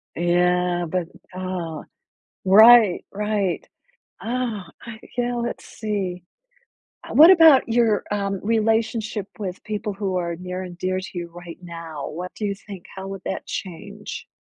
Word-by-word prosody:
Yeah, 175 Hz, 0 st, +2 dB
but, 180 Hz, -2 st, -1 dB, 0.3 s
aw 180 Hz, -4 st, -4 dB, 0.6 s
right, 215 Hz, 0 st, +7 dB
right. 205 Hz, -2 st, -1 dB, 0.6 s
Oh, 230 Hz, -4 st, -2 dB, 0.2 s
I 225 Hz, -2 st, -9 dB, 0.2 s
yeah, 245 Hz, 0 st, 0 dB
let's 235 Hz, 0 st, -4 dB
see. 190 Hz, -5 st, -4 dB, 0.8 s
Uh, -, -, -8 dB
what 320 Hz, +4 st, +9 dB
about 325 Hz, -9 st, +7 dB
your, 225 Hz, -2 st, +2 dB
um, 200 Hz, -2 st, -1 dB
relationship 220 Hz, -1 st, 0 dB
with 190 Hz, -3 st, -5 dB
people 210 Hz, 0 st, -3 dB
who 195 Hz, -2 st, -3 dB
are 170 Hz, -1 st, -2 dB
near 180 Hz, +1 st, -5 dB
and 175 Hz, -1 st, -9 dB
dear 185 Hz, +1 st, -1 dB
to 190 Hz, -, -8 dB
you 175 Hz, -1 st, -4 dB
right 175 Hz, -1 st, -10 dB
now? 165 Hz, -4 st, -7 dB
What 180 Hz, +3 st, -6 dB
do 215 Hz, -, -4 dB
you 200 Hz, -, -1 dB
think 195 Hz, -2 st, -11 dB
how 190 Hz, 0 st, -7 dB
would 195 Hz, -1 st, -7 dB
that 190 Hz, -, -4 dB
change? 200 Hz, +3 st, -7 dB
195 Hz, 145 wpm, -23 LUFS, 180-220 Hz, 0.8 s, what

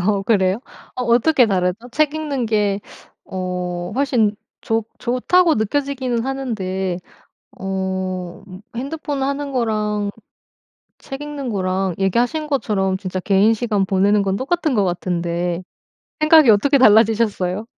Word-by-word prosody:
어 195 Hz, +2 st, +1 dB
그래요? 195 Hz, 0 st, +2 dB, 0.3 s
어 250 Hz, -, -3 dB
어떻게 245 Hz, +2 st, +4 dB
다르죠? 190 Hz, +4 st, -1 dB
책 305 Hz, +3 st, +1 dB
읽는 285 Hz, -6 st, -2 dB
게 205 Hz, -2 st, +1 dB, 0.5 s
어 180 Hz, 0 st, -4 dB
훨씬 245 Hz, -6 st, +2 dB, 0.3 s
좋 225 Hz, -1 st, 0 dB
좋다고 315 Hz, +7 st, +2 dB
느껴지기는 255 Hz, +1 st, -1 dB
하는데 190 Hz, -9 st, -3 dB, 0.6 s
어 190 Hz, -1 st, -3 dB, 0.3 s
핸드폰 285 Hz, +2 st, -4 dB
하는 280 Hz, +1 st, -2 dB
거랑 210 Hz, -4 st, -1 dB, 0.9 s
책 270 Hz, +1 st, -8 dB
읽는 290 Hz, -3 st, -5 dB
거랑 190 Hz, -2 st, -1 dB
얘기하신 245 Hz, -, 0 dB
것처럼 195 Hz, -9 st, 0 dB
진짜 185 Hz, -1 st, -4 dB
개인 200 Hz, +4 st, +3 dB
시간 210 Hz, -4 st, 0 dB
보내는 200 Hz, +1 st, +3 dB
건 190 Hz, 0 st, 0 dB
똑같은 310 Hz, +2 st, 0 dB
것 205 Hz, -, +3 dB
같은데 175 Hz, 0 st, -2 dB, 0.6 s
생각이 305 Hz, -4 st, +7 dB
어떻게 220 Hz, +7 st, +4 dB
달라지셨어요? 215 Hz, -4 st, +3 dB
215 Hz, 265 characters per minute, -20 LUFS, 190-265 Hz, 0.9 s, 생각이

